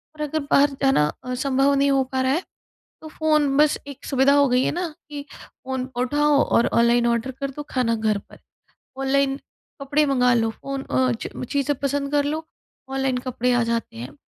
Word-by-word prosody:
और 305 Hz, -, -9 dB
अगर 300 Hz, +1 st, -1 dB
बाहर 285 Hz, +1 st, +5 dB
जाना 270 Hz, -, +4 dB, 0.2 s
अ, 255 Hz, 0 st, -4 dB
संभव 270 Hz, +2 st, +2 dB
नहीं 280 Hz, 0 st, +2 dB
हो 270 Hz, -1 st, +3 dB
पा 260 Hz, -, +1 dB
रहा 260 Hz, 0 st, +1 dB
है, 335 Hz, +6 st, 0 dB, 0.6 s
तो 315 Hz, -, -9 dB
फ़ोन 305 Hz, -3 st, +1 dB
बस 300 Hz, 0 st, +4 dB
एक 280 Hz, -1 st, -10 dB
सुविधा 270 Hz, 0 st, +3 dB
हो 285 Hz, -1 st, +5 dB
गई 250 Hz, +1 st, +2 dB
है -, -, +1 dB
ना 355 Hz, 0 st, -2 dB, 0.2 s
कि 290 Hz, -1 st, -6 dB
फ़ोन 260 Hz, -1 st, -7 dB
उठाओ 290 Hz, +3 st, +2 dB
और 235 Hz, -, +2 dB
ऑनलाइन 235 Hz, +1 st, +3 dB
ऑर्डर 235 Hz, +2 st, 0 dB
कर 275 Hz, -, -2 dB
दो 295 Hz, +2 st, -7 dB
खाना 245 Hz, -3 st, +1 dB
घर 215 Hz, -2 st, 0 dB
पर। -, -, -16 dB, 0.6 s
ऑनलाइन 270 Hz, 0 st, +1 dB, 0.4 s
कपड़े 295 Hz, +2 st, +2 dB
मंगा 250 Hz, -3 st, +3 dB
लो। 225 Hz, -1 st, +1 dB
फ़ोन 275 Hz, +4 st, -6 dB
अ, 255 Hz, -1 st, +1 dB
च 235 Hz, -, -6 dB
चीज़ें 285 Hz, 0 st, 0 dB
पसंद 280 Hz, 0 st, -1 dB
कर 290 Hz, -1 st, +2 dB
लो, 315 Hz, +2 st, -3 dB, 0.4 s
ऑनलाइन 265 Hz, -1 st, -1 dB
कपड़े 250 Hz, 0 st, 0 dB
आ 245 Hz, -1 st, +2 dB
जाते 230 Hz, -, -3 dB
हैं। 120 Hz, +3 st, -8 dB
270 Hz, 200 wpm, -23 LUFS, 250-285 Hz, 0.6 s, बाहर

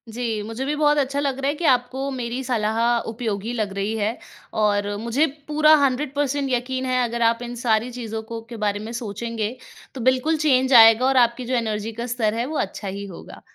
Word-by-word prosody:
जी। 230 Hz, -3 st, -2 dB
मुझे 225 Hz, +5 st, -5 dB
भी 295 Hz, +2 st, -1 dB
बहुत 295 Hz, 0 st, +3 dB
अच्छा 280 Hz, 0 st, 0 dB
लग 275 Hz, -2 st, -1 dB
रहा 270 Hz, -, -1 dB
है 290 Hz, -, -1 dB
कि 335 Hz, -, -4 dB
आपको 260 Hz, +1 st, +1 dB
मेरी 250 Hz, 0 st, -4 dB
सलाह 220 Hz, -3 st, -1 dB, 0.3 s
उपयोगी 225 Hz, -1 st, -3 dB
लग 215 Hz, -4 st, -2 dB
रही 200 Hz, +3 st, -2 dB
है 215 Hz, +2 st, -1 dB, 0.4 s
और 205 Hz, -1 st, +1 dB
मुझे 235 Hz, +8 st, +1 dB, 0.2 s
पूरा 305 Hz, +1 st, +5 dB
100 270 Hz, +1 st, 0 dB
पर्सेंट 285 Hz, -1 st, 0 dB
यक़ीन 255 Hz, +1 st, -1 dB
है 255 Hz, -1 st, +1 dB
अगर 235 Hz, 0 st, -3 dB
आप 230 Hz, -, -6 dB
इन 245 Hz, -, -6 dB
सारी 225 Hz, +2 st, +2 dB
चीज़ों 225 Hz, -2 st, -5 dB
को 230 Hz, -1 st, -4 dB
के 235 Hz, -, -7 dB
बारे 205 Hz, 0 st, 0 dB
में -, -, -6 dB
सोचेंगे 225 Hz, +1 st, -4 dB, 0.4 s
तो 260 Hz, -, -5 dB
बिल्कुल 260 Hz, +6 st, +2 dB
चेंज 260 Hz, -1 st, +3 dB
आएगा 225 Hz, +1 st, +8 dB
और 265 Hz, 0 st, +2 dB
आपकी 235 Hz, +2 st, -9 dB
जो 255 Hz, -, -3 dB
एनर्जी 220 Hz, -2 st, -2 dB
का -, -, -2 dB
स्तर 220 Hz, -3 st, +1 dB
है 230 Hz, +2 st, -1 dB
वो 305 Hz, +3 st, -4 dB
अच्छा 205 Hz, -, -3 dB
ही 200 Hz, +1 st, -5 dB
होगा। 190 Hz, -4 st, -11 dB
240 Hz, 215 wpm, -22 LUFS, 220-265 Hz, 0.4 s, आएगा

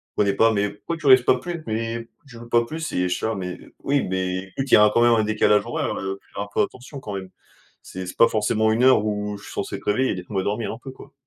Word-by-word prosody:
comprenaient 100 Hz, -1 st, +2 dB
pas: 115 Hz, 0 st, +4 dB
«Mais 100 Hz, -1 st, +1 dB
pourquoi 165 Hz, +11 st, -6 dB
tu 155 Hz, -, -11 dB
restes 130 Hz, -2 st, +7 dB
pas 130 Hz, -, +4 dB
plus? 170 Hz, 0 st, -6 dB
Mais 115 Hz, +1 st, -2 dB
pourquoi 115 Hz, -, -16 dB, 0.2 s
tu 115 Hz, -4 st, -12 dB
joues 120 Hz, 0 st, -11 dB
pas 120 Hz, 0 st, +3 dB
plus?» 160 Hz, +6 st, -5 dB
Et 90 Hz, 0 st, +1 dB
je 90 Hz, -, 0 dB
suis -, -, -4 dB
là: 110 Hz, -1 st, -1 dB
«Mais, 90 Hz, -2 st, -5 dB, 0.3 s
oui, 140 Hz, 0 st, +1 dB
mais 95 Hz, 0 st, -1 dB
écoute 95 Hz, +8 st, -5 dB
il -, -, +2 dB
y -, -, +8 dB
a 105 Hz, 0 st, +6 dB
quand 120 Hz, -, +3 dB
même 120 Hz, 0 st, +5 dB
un 110 Hz, -1 st, +3 dB
décalage 105 Hz, -1 st, +2 dB
horaire, -, -, -2 dB
heu, 95 Hz, +1 st, -4 dB
faut -, -, -30 dB
faire -, -, -3 dB
un 100 Hz, -, -8 dB
peu -, -, +2 dB
attention 135 Hz, +2 st, -7 dB
quand 105 Hz, -, -7 dB
même. 95 Hz, -1 st, -6 dB, 0.5 s
C'est 95 Hz, -1 st, -7 dB
c'est -, -, -8 dB
pas 115 Hz, -, +7 dB
forcément 110 Hz, 0 st, +1 dB
une 115 Hz, +3 st, +1 dB
heure 130 Hz, -5 st, +5 dB
où 105 Hz, -1 st, -2 dB
je 100 Hz, -, -15 dB
suis -, -, -10 dB
censé -, -, -3 dB
être -, -, -15 dB
réveillé, 115 Hz, +3 st, +1 dB
laissez-moi 95 Hz, +1 st, -3 dB
dormir 105 Hz, +4 st, -2 dB
un 115 Hz, -, -9 dB
peu 135 Hz, -, -7 dB
quoi». 140 Hz, +2 st, -14 dB
110 Hz, 295 wpm, -23 LUFS, 100-125 Hz, 0.5 s, y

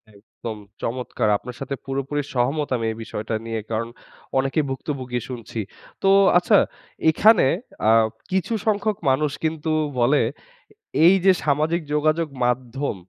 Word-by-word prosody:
একদম 110 Hz, +2 st, -8 dB, 0.2 s
চমৎকার! 120 Hz, -2 st, -1 dB
আপনার 125 Hz, +2 st, -9 dB
সাথে 135 Hz, 0 st, -4 dB
পুরোপুরি 135 Hz, +2 st, -2 dB
সহমত 140 Hz, +4 st, 0 dB
আমি 115 Hz, -, -3 dB
এই 110 Hz, -, -7 dB
বিষয়টা 110 Hz, 0 st, -4 dB
নিয়ে, 115 Hz, -1 st, -3 dB
কারণ 115 Hz, +1 st, -1 dB, 0.5 s
অনেকেই 135 Hz, +3 st, +1 dB
ভুক্তভোগী 130 Hz, -2 st, -3 dB
শুনছি। 115 Hz, -2 st, -6 dB, 0.4 s
তো 195 Hz, -, +4 dB, 0.3 s
আচ্ছা 200 Hz, +4 st, +4 dB, 0.5 s
এখানে 215 Hz, +4 st, +5 dB, 0.4 s
আ -, -, +7 dB, 0.4 s
কিছু 190 Hz, +4 st, 0 dB
সংখ্যক 210 Hz, 0 st, +1 dB
মানুষ 140 Hz, +2 st, +2 dB
কিন্তু 160 Hz, 0 st, -1 dB, 0.3 s
বলে, 135 Hz, +5 st, +4 dB, 0.8 s
"এই 180 Hz, -, +8 dB
যে 190 Hz, -, +8 dB
সামাজিক 155 Hz, +4 st, +1 dB
যোগাযোগ 155 Hz, +2 st, +2 dB, 0.2 s
মাধ্যম, 125 Hz, +1 st, -1 dB
135 Hz, 130 wpm, -23 LUFS, 120-155 Hz, 0.8 s, এই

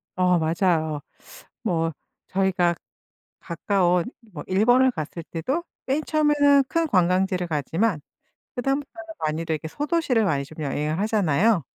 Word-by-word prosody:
어 180 Hz, -1 st, +3 dB
맞아요. 160 Hz, -2 st, 0 dB, 0.6 s
뭐 165 Hz, -1 st, 0 dB, 0.4 s
저희가 185 Hz, -2 st, +1 dB, 0.6 s
가까운 175 Hz, 0 st, +1 dB, 0.3 s
뭐 -, -, -6 dB
일본을 245 Hz, +7 st, +4 dB
갔을 165 Hz, -2 st, -6 dB
때도 260 Hz, -, -3 dB, 0.2 s
맨 280 Hz, +4 st, 0 dB
처음에는 290 Hz, -2 st, +4 dB
큰 330 Hz, -1 st, +1 dB
관광지를 185 Hz, -, +1 dB
가지만 165 Hz, -, 0 dB, 0.6 s
그다음부터는 275 Hz, +6 st, -3 dB
많이들 160 Hz, +1 st, -1 dB
이렇게 155 Hz, +1 st, -5 dB
소도시를 290 Hz, -, 0 dB
많이 145 Hz, -7 st, 0 dB
좀 155 Hz, +2 st, -11 dB
여행을 150 Hz, +3 st, -2 dB
하잖아요. 205 Hz, -3 st, +2 dB
185 Hz, 295 characters per minute, -24 LUFS, 160-250 Hz, 0.6 s, 일본을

